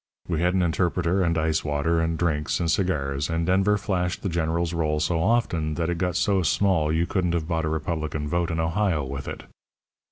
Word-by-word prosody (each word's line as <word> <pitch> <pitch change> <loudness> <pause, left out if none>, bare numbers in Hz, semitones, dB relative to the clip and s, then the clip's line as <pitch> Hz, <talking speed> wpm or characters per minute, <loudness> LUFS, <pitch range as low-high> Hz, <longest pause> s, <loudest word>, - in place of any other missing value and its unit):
We 85 -2 -1
had 90 +1 +2
an 95 - +2
interpreter, 90 +2 +1
and 85 -2 +1
ice 80 0 +1
water, 75 +3 0
and 80 0 -1
drinks, 75 -3 0
and 85 -2 +1
cigars, 75 -6 0
and 80 0 0
Denver 95 +3 +3
flashed 90 -3 -2
the 100 - -1
General's 85 0 -1
roll 75 -2 0
so 80 +2 0
often 85 -8 +1
that 85 0 -1
it 85 - -3
got 90 -2 -1
so 100 -2 +2
small 80 -1 +2
you 80 +2 +1
couldn't 90 -2 0
have 80 -2 -2
bought 80 -2 -1
a - - -1
Republican 80 -1 -2
vote 85 +2 0
in 80 -1 -2
Ohio 80 -1 +1
with 70 +1 -6
it. - - -6
85 Hz, 210 wpm, -25 LUFS, 80-90 Hz, -, Denver